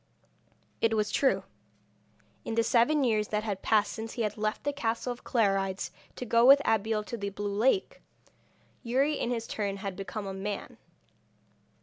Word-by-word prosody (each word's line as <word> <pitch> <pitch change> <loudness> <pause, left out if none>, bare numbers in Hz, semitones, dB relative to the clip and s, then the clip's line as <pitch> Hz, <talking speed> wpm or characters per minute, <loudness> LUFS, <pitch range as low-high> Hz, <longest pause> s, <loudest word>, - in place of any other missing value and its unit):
It 225 -1 +3
was 210 -1 0
true. 270 - +2 1.0
In 225 - -4
the 230 - +3
seven 265 +6 +3
years 215 -4 +1
that 210 0 -1
had 200 -3 -3
passed 210 -2 +2
since 220 0 -6
he 235 - -2
had 210 -1 -1
left 215 0 -2
the 285 - -1
castle 240 -2 -2
of 240 - -17
Clarides 195 -4 0 0.2
to 250 - -5
go 230 0 +3
with 275 +3 +9
Abeille 220 0 +1
to 235 - -6
the 200 -2 -3
blue 205 0 -4
lake, 265 - +1 0.8
Youri 270 +5 +1
in - - -1
his 230 -2 -2
turn 200 -3 -3
had 195 -1 -5
become 200 +2 -5
a 195 - -4
man. 200 +1 -5
220 Hz, 170 wpm, -29 LUFS, 205-235 Hz, 1.0 s, with